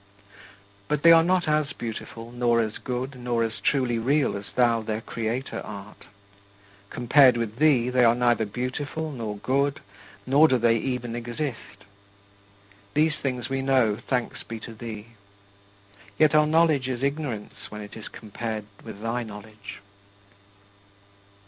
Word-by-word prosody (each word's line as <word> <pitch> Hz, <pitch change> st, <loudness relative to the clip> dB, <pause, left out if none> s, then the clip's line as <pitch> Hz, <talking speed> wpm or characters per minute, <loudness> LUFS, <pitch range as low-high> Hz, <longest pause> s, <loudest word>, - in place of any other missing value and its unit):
But 150 Hz, -1 st, -1 dB
they 170 Hz, -, +9 dB
are 165 Hz, 0 st, +8 dB
not 180 Hz, 0 st, +1 dB
as 150 Hz, -1 st, +1 dB
beautiful, 115 Hz, 0 st, -7 dB
nor 120 Hz, -1 st, +2 dB
as 110 Hz, -2 st, -2 dB
good, 130 Hz, +2 st, -4 dB
nor 120 Hz, -2 st, -1 dB
as 115 Hz, -1 st, -3 dB
truly 125 Hz, -4 st, +1 dB
real 140 Hz, +3 st, +1 dB
as 100 Hz, 0 st, -6 dB
thou 120 Hz, -2 st, +3 dB
their 110 Hz, 0 st, -3 dB
Creator 115 Hz, +3 st, -4 dB
art. 105 Hz, 0 st, -10 dB, 0.8 s
Compared 125 Hz, +1 st, +5 dB
with 115 Hz, -1 st, -3 dB
thee, 130 Hz, -5 st, +3 dB
they 125 Hz, -1 st, +4 dB
are 115 Hz, 0 st, +5 dB
neither 120 Hz, -3 st, +2 dB
beautiful 140 Hz, +7 st, -4 dB
nor 110 Hz, -6 st, -5 dB
good, 140 Hz, +6 st, 0 dB, 0.5 s
nor 145 Hz, +5 st, +6 dB
do 130 Hz, -, +3 dB
they 115 Hz, -1 st, +3 dB
even 120 Hz, -1 st, -3 dB
exist. 120 Hz, -4 st, -5 dB, 1.1 s
These 155 Hz, +1 st, +3 dB
things 125 Hz, -3 st, -3 dB
we 135 Hz, 0 st, -2 dB
know, 130 Hz, -6 st, +3 dB
thanks 125 Hz, +2 st, -3 dB
be 115 Hz, -1 st, -7 dB
to 115 Hz, -, -8 dB
thee. 110 Hz, -1 st, -8 dB, 1.1 s
Yet 155 Hz, -1 st, +4 dB
our 150 Hz, 0 st, +5 dB
knowledge 155 Hz, -4 st, +3 dB
is 130 Hz, 0 st, -3 dB
ignorance 140 Hz, -7 st, -3 dB
when 105 Hz, 0 st, -7 dB
it 105 Hz, -, -10 dB
is 110 Hz, -, -8 dB
compared 110 Hz, 0 st, -6 dB, 0.2 s
with 110 Hz, -2 st, -9 dB
thy 115 Hz, +2 st, -1 dB
knowledge. 105 Hz, -2 st, -10 dB
120 Hz, 145 wpm, -25 LUFS, 115-140 Hz, 1.1 s, they